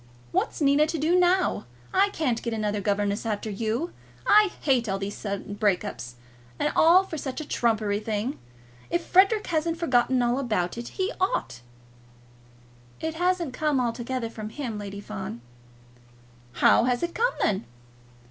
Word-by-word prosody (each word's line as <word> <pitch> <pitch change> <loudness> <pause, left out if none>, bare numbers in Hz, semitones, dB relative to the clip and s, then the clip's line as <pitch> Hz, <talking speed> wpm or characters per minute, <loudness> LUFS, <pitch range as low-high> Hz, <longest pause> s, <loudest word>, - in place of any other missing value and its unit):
What's - - -1
Nina 285 +2 +4
to 325 - -2
do 315 +4 +2
now? 360 - +2 0.3
I 395 +2 +4
can't 270 - -1
get 235 -2 -3
another 210 -1 -1
governess 205 +1 0
after 215 -1 -3
you. 225 - -2 0.3
I 420 0 +6
hate 250 -6 +2
all 195 - 0
these 195 +1 -4
sudden 200 -1 -5
breaks 205 -2 +1
up. 205 - -6 0.6
And - - 0
all 350 +4 +6
for 320 -5 -6
such 265 0 -4
a 310 - -5
trumpery 215 -3 +1
thing. 220 +4 -3 0.5
If 345 0 -1
Frederic 400 +4 +4
hasn't 330 0 -1
forgotten 255 -5 +2
all 240 +2 +1
about 215 -9 -1
it, 235 0 -6
he 380 +3 0
ought." 245 - -1 1.4
"It 320 0 -3
hasn't 350 -3 0
come 300 -2 +1
altogether 240 0 -2
from 215 -2 -6
him, 230 -4 -5
Lady 200 0 -6
Fawn." 195 - -6 1.1
"How - - +5
has 250 +2 0
it 340 0 -2
come, 480 +3 +1
then?" 195 - +1
245 Hz, 155 wpm, -26 LUFS, 210-330 Hz, 1.4 s, I